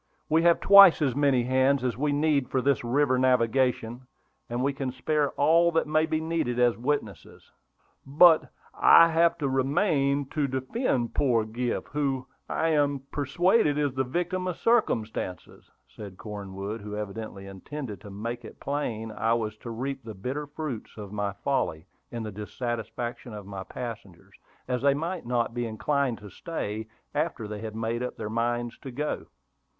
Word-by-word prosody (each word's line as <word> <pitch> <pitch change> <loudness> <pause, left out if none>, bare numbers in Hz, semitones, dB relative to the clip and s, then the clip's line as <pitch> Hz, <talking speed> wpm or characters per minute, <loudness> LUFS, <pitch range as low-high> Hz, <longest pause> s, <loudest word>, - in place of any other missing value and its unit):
"We 160 +1 +4
have 170 0 +4
twice 200 -3 +8
as 130 -4 +1
many 140 -4 +3
hands 130 +2 +2
as 125 -4 0
we 145 +4 0
need 145 -2 +1
for 130 - +1
this 135 0 +1
river 130 +1 +2
navigation; 125 -1 +1 0.4
and 120 +2 -2
we 140 +1 +1
can 135 -1 -3
spare 145 +3 0
all 165 +4 +4
that 165 - +2
may 155 +1 +2
be 155 -1 0
needed 160 -7 -1
as 120 -1 +3
witnesses." 115 - -4 0.5
"But 155 +4 +5 0.2
I 165 0 +7
have 170 +1 +3
to 145 -4 -1
remain 140 +1 +1
to 150 -2 0
defend 130 - -1
poor 120 -5 +2
Griff, 120 +2 -3
who, 135 -3 -1 0.2
I 165 - 0
am 145 -3 +1
persuaded, 150 - +2
is 145 -3 0
a 130 - +1
victim 180 +7 -2
of 180 - -3
circumstances," 110 - -1 0.2
said 100 -3 -10
Cornwood, 100 +1 -6
who 105 0 -6
evidently 105 -1 -6
intended 105 +4 -7
to 105 - -10
make 115 +5 -5
it 110 - -12
plain 115 -6 -3
I 115 +2 +1
was 110 -2 -2
to 115 - -9
reap 130 +3 -4
the 110 -2 -8
bitter 135 +9 -4
fruits 145 -8 -6
of 105 -2 -8
my 105 -1 -1
folly 100 - -2 0.3
in 115 -1 -4
the 110 - -5
dissatisfaction 120 +2 -5
of 105 -2 -8
my 100 -1 -6
passengers, 115 -8 -8 0.3
as 125 -1 -1
they 140 0 +4
might 165 0 -4
not 120 -1 0
be 120 -1 -2
inclined 120 +3 0
to 105 -2 -11
stay 110 - -5 0.3
after 150 -7 -2
they 105 0 -6
had 110 -1 -6
made 115 +1 -2
up 125 - -4
their 110 -1 -5
minds 120 +1 -1
to 135 - -8
go. 145 +4 -3
125 Hz, 170 wpm, -27 LUFS, 110-145 Hz, 0.5 s, twice